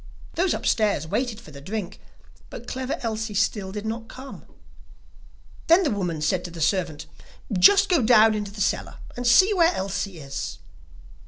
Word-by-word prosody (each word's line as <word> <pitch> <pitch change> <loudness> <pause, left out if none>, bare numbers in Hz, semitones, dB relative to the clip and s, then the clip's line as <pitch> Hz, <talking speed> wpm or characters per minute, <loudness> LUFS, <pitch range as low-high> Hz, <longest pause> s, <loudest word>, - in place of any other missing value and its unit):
Those 360 +1 +1
upstairs 210 -9 0
waited 230 +6 -2
for 155 - -14
the 140 -1 -11
drink, 195 +3 -5 0.5
but - - -9
Clever 260 +1 -3
Elsie 220 -2 -3
still 200 -1 0
did 210 +1 -6
not 225 +1 -4
come. 265 +3 -11 1.2
Then 340 +4 +5
the 300 - 0
woman 180 -6 -2
said 175 +3 0
to - - -5
the 170 0 -10
servant: 160 -2 -1 0.5
'Just 195 - +6
go 345 -6 +3
down 220 -1 +5
into 210 -1 -3
the 200 0 -7
cellar 200 - -1 0.2
and 245 0 -3
see 375 - +6
where 345 -2 +3
Elsie 195 -1 -3
is. 140 -3 -6
215 Hz, 165 wpm, -24 LUFS, 185-245 Hz, 1.2 s, Just